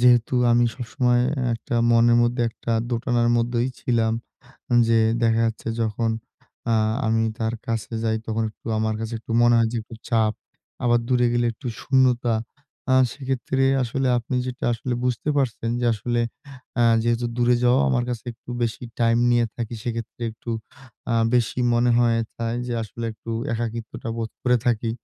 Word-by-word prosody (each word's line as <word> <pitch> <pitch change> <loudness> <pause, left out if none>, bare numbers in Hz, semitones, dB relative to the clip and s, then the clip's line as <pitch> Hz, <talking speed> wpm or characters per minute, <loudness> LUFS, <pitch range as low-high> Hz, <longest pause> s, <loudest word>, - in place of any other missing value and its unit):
যেহেতু 120 0 +4 0.2
আমি 120 +1 +4
সবসময় 125 0 +1 0.3
একটা 115 - -5 0.2
মনের 115 0 +5
মধ্যে 120 +1 +1
একটা 115 - -4 0.2
দোটানার 120 0 +1
মধ্যেই 120 +1 +1
ছিলাম। 115 -2 +1 0.8
যে 115 0 +4 0.2
দেখা 115 -1 +3
যাচ্ছে 115 0 -3
যখন 115 +1 0 0.6
আ - - +4 0.3
আমি 110 0 +2
তার 115 -1 -1
কাছে 115 -1 -3
যাই। 110 -1 +1
তখন 110 0 -1
একটু 110 - -14
আমার 110 0 0
কাছে 115 +1 -4
একটু 115 - -9
মনে 120 0 +5
হয় 115 -1 +3
যে - - -4
একটু 115 +1 -11
চাপ, 110 -2 +2 0.5
আবার 120 -1 +4
দূরে 125 -1 +3
গেলে 120 0 +2
একটু 130 +3 -8
শূন্যতা। 125 -3 +2 0.6
আ - - +6 0.2
সেক্ষেত্রে 135 -1 -1 0.2
আসলে 130 +3 -1
আপনি 120 +2 -3
যেটা 125 -1 -4
আসলে 120 +2 -3
বুঝতে 125 +3 -1
পারছেন। 115 -4 0
যে 120 - 0
আসলে 120 +3 -2 0.6
আ - - +5 0.2
যেহেতু 120 +1 +1
দূরে 120 0 +4
যাওয়া 125 +2 +4
আমার 125 -2 +1
কাছে 120 -3 -4
একটু 115 - -17
বেশি 115 +1 -2 0.2
টাইম 115 0 +3
নিয়ে 120 -1 +3
থাকি। 120 -1 -4
সেক্ষেত্রে 115 0 -5
একটু 115 +2 -10 0.6
আ - - +2 0.2
বেশি 120 0 +1
মনে 120 +1 +3
হয়। 115 -1 +3 0.2
তা 115 - -5
এইযে 120 0 -3
আসলে 115 +2 -6
একটু 110 +1 -12 0.2
একাকিত্বটা 115 0 -4
বোধ 115 -1 -3
করে 125 -1 +3
থাকি। 115 -1 +1
120 Hz, 165 wpm, -23 LUFS, 115-125 Hz, 0.8 s, আ